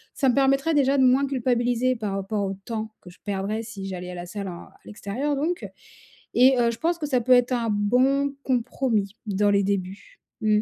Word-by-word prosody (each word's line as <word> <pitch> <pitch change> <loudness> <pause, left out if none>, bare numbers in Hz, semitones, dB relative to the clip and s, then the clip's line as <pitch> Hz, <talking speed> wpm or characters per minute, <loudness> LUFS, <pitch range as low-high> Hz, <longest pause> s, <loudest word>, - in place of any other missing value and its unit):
ça 270 - +2
me 245 - +3
permettrait 275 +3 +2
déjà 280 -1 +3
de 265 - +4
moins 260 +2 +4
culpabiliser 250 -1 +1
par 210 -3 -4
rapport 195 +1 -2
au 195 - -3
temps 220 -1 -4
que 180 - -13
je - - -21
perdrais 205 +2 -2
si 200 -4 -7
j'allais 180 -1 -6
à - - -7
la 175 0 -6
salle 200 +2 -6
en 175 - -8
à - - -19
l'extérieur 235 +8 -3
donc 335 +6 -2 0.7
et 255 +1 +6
heu, 235 -1 +3
je 225 - -9
pense 340 +1 0
que 300 - -3
ça 255 -4 +1
peut 255 - -1
être 245 0 +4
un 235 -2 0
bon 260 +7 +2
compromis 230 -5 -1
dans 205 0 +2
les 200 0 +3
débuts. 200 - -4 0.2
Mmh. 215 -1 +3
235 Hz, 215 wpm, -24 LUFS, 200-265 Hz, 0.7 s, et